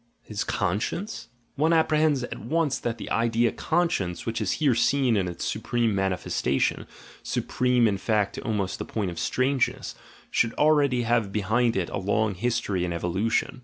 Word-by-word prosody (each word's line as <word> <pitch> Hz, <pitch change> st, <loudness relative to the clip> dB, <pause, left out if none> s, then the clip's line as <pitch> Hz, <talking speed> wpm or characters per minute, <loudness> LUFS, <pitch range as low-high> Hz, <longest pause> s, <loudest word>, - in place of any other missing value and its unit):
His 105 Hz, 0 st, -3 dB
conscience? 105 Hz, -, -2 dB
— 115 Hz, -, -41 dB
One 165 Hz, +1 st, +4 dB
apprehends 155 Hz, -4 st, +3 dB
at -, -, -6 dB
once 150 Hz, +3 st, 0 dB
that 115 Hz, -1 st, -3 dB
the -, -, -8 dB
idea 115 Hz, 0 st, +2 dB
"conscience," 160 Hz, -, -1 dB
which 115 Hz, 0 st, -2 dB
is -, -, 0 dB
here 145 Hz, -5 st, +2 dB
seen 130 Hz, 0 st, +2 dB
in 95 Hz, -3 st, +1 dB
its 85 Hz, -, -5 dB
supreme 120 Hz, -3 st, 0 dB
mani 95 Hz, -1 st, +1 dB
festation, 70 Hz, -6 st, -1 dB, 0.3 s
supreme 125 Hz, -2 st, +1 dB
in 100 Hz, -2 st, 0 dB
fact 105 Hz, -1 st, 0 dB
to -, -, -6 dB
almost 105 Hz, -6 st, -2 dB
the -, -, -2 dB
point 100 Hz, -5 st, -2 dB
of 85 Hz, -, -7 dB
strange 130 Hz, 0 st, +1 dB
ness, -, -, -8 dB, 0.4 s
should 115 Hz, 0 st, +1 dB
already 145 Hz, -5 st, +3 dB
have 115 Hz, -3 st, +1 dB
behind 110 Hz, +4 st, +1 dB
it 90 Hz, -3 st, -1 dB
a -, -, -2 dB
long 105 Hz, +2 st, +1 dB
history 105 Hz, -2 st, -1 dB
and 85 Hz, -1 st, -2 dB
evolution. 95 Hz, +9 st, -1 dB
115 Hz, 175 wpm, -26 LUFS, 100-130 Hz, 0.4 s, One